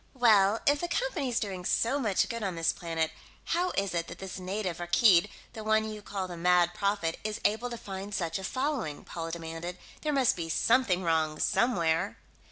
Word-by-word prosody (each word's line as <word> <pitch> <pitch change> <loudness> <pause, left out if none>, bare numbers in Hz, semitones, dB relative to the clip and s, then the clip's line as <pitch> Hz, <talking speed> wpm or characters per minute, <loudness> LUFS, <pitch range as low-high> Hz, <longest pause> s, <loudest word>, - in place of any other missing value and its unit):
"Well, 220 -4 +5
if 285 0 +3
the 345 - -1
Company's 340 - -1
doing 190 -4 -4
so 235 +9 +1
much 215 -8 +1
good 230 -2 -4
on 190 -4 -2
this 165 0 +1
planet, 165 -2 -2 0.3
how 355 +2 +1
is 195 -2 0
it 170 -1 -1
that - - -8
this 190 -1 -7
native, 185 -2 -3
Rakkeed, 175 +2 +4 0.2
the 220 - -7
one 220 0 +2
you 215 -1 -6
call 195 -2 -4
the 175 - -7
Mad 175 0 +3
Prophet, 200 -5 -1
is 215 +1 -3
able 220 +4 +1
to 235 - -5
find 195 -1 -7
such 170 -3 -2
a - - -7
following?" 255 - -2
Paula 165 -1 -5
demanded. 165 +1 -5 0.2
"There 305 - 0
must 270 -4 +3
be 165 -2 -4
something 190 0 +2
wrong 160 -2 +1
somewhere." 175 -6 +1
195 Hz, 190 wpm, -29 LUFS, 170-230 Hz, 0.3 s, Well